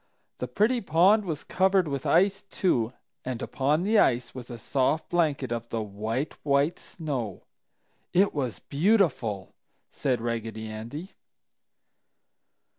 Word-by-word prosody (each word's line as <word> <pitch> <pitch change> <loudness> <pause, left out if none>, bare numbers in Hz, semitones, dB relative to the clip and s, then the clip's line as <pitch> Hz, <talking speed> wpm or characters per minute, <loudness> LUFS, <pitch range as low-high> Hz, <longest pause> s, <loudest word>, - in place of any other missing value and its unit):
The 125 - -2
pretty 215 - +2
pond 190 +5 +4
was 155 -4 -3
covered 190 -2 +2
with 140 -2 -3
ice, 195 +4 +3
too, 125 - 0 0.3
and 125 -2 -4
upon 145 +5 0
the 215 +2 +4
ice 125 -6 +2
was 125 -2 -9
a 120 - -6
soft 135 +6 0
blanket 150 -7 +1
of 115 0 -3
the 115 -1 -2
white, 110 +7 -3
white 140 +3 +2
snow. 130 - -5 0.7
It 195 +3 +3
was 130 -6 -2
beautiful!" 145 - +1 0.4
said 130 -4 0
Raggedy 115 -1 -3
Andy. 120 - -7
140 Hz, 125 wpm, -27 LUFS, 115-175 Hz, 0.7 s, pond